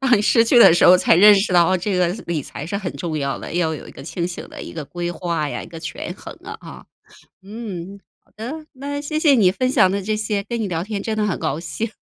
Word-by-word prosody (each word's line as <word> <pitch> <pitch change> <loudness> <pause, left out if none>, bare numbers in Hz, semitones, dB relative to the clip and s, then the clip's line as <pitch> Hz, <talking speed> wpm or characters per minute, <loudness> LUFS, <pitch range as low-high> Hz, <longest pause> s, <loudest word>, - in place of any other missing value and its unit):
当 255 -4 +4
你 205 - 0
失 230 +2 +4
去 240 +1 +4
的 225 - +9
时 175 - +4
候 180 - +8
才 180 - +3
认 205 +3 +8
识 195 -1 +1
到 180 +1 +4
这 185 +1 -2
个 180 -1 +2 0.2
理 165 -4 -2
财 145 - -8
是 200 +5 -3
很 190 -3 -4
重 160 -3 -3
要 140 -1 -2
的， - - -8
要 160 -3 0
有 - - -9
一 - - -10
个 - - -12
清 170 +3 -3
醒 180 - -7
的 - - -9
一 - - -8
个 155 -3 -6
规 175 +3 -4
划 170 -4 -2
呀， - - -5
一 - - -10
个 165 -1 -10
权 - - -6
衡 - - -10
啊， - - -7
啊。 - - -11 0.6
嗯， 200 -2 -8 0.2
好 - - -33
的， 285 +9 -7
那 285 +2 -5
谢 305 +1 -3
谢 300 -3 +5
你 195 -7 +4
分 255 +5 -1
享 190 - +4
的 200 +1 -1
这 215 +2 -1
些， 210 -2 -2
跟 230 +2 -4
你 205 - -1
聊 170 -1 -2
天 205 -1 -4
真 220 -1 -3
的 210 - +1
很 200 - -2
高 150 +4 -2
兴 170 +7 -4
195 Hz, 295 characters per minute, -21 LUFS, 170-220 Hz, 0.6 s, 的